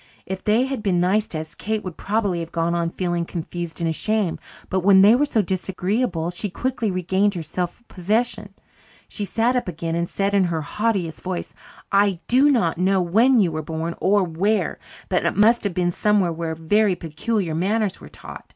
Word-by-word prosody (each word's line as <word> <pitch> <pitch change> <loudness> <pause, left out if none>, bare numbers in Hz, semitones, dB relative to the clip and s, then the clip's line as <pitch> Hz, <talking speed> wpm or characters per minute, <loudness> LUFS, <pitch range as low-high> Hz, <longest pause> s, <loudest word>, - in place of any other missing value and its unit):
If 190 0 -5
they 220 +4 +3
had 265 -4 -3
been 190 -4 +1
nice 200 +5 +2
to 160 - -4
us, 160 +1 -7
Kate 215 +4 -3
would 185 -3 -6
probably 200 -4 -1
have 165 -1 -6
gone 170 0 0
on 170 -1 0
feeling 175 -1 -2
confused 170 0 -6
and 170 - 0
ashamed. 200 +3 -1 0.3
But 190 - 0
when 190 +1 +6
they 210 +3 +7
were 285 +4 +3
so 225 -7 +1
disagreeable 185 0 -1
she 190 +4 -4
quickly 240 +3 -2
regained 190 +2 +1
her 170 - -4
self 175 +7 -4
possession. 210 +1 -2 0.5
She 205 - -4
sat 230 +5 +1
up 245 - -1
again 165 -1 -4
and 170 +1 -1
said 200 0 -1
in 195 -2 +4
her 165 -3 -2
haughtiest 195 -2 -2
voice, 185 -1 -4 0.4
"I 200 -2 +3
do 265 +4 +5
not 205 - +1
know 190 +1 +3
when 225 +9 +4
you 180 -4 +2
were 155 0 -3
born, 160 +2 -4
or 200 +1 +3
where, 185 +6 0 0.3
but - - 0
it - - 0
must 225 +3 +4
have 190 -4 -2
been 175 -1 +1
somewhere 200 -2 +1
where 165 0 -3
very 190 +5 +2
peculiar 175 +2 -2
manners 195 +4 0
were - - -11
taught. - - -11
190 Hz, 195 wpm, -22 LUFS, 170-215 Hz, 0.5 s, they